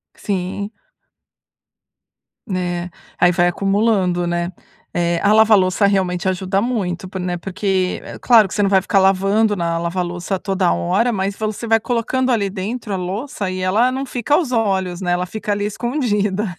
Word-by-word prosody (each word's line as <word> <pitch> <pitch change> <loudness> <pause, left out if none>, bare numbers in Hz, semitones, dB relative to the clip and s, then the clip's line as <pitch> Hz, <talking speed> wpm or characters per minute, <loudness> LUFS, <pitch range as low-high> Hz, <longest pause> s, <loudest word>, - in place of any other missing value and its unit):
Sim. 200 +1 -3 1.8
Né? 180 -2 -2 0.3
Aí 175 - +5
vai 175 0 +2
acumulando, 195 -2 +1
né? 175 0 -1 0.4
É, 170 -1 0
a 205 - +4
lava-louça 210 -3 +4
realmente 190 -1 0
ajuda 190 +1 -1
muito, 195 -7 -2
por 190 - -5
né, 180 -1 -2
porque 185 +1 -1
é - - -9
claro 225 -5 +5
que - - -7
você 210 - +1
não 200 - +2
vai 190 -1 +5
ficar 195 +1 +1
lavando 195 +3 +3
na 170 -3 -1
lava-louça 175 +2 -2
toda 190 -2 0
hora, 200 +8 +1
mas 195 -1 -2
você 215 +1 -3
vai 225 0 +4
colocando 250 +3 0
ali 205 -4 +1
dentro 205 +3 -4
a - - 0
louça 195 +3 -4
e 185 0 -4
ela 210 +7 +2
não 265 +1 -3
fica 250 +3 -1
aos 310 -4 +2
olhos, 190 -6 0
né? 175 -1 0
Ela 180 +1 0
fica 210 +2 -4
ali 205 0 -1
escondida, 210 -5 -1
195 Hz, 165 wpm, -19 LUFS, 180-215 Hz, 1.8 s, Aí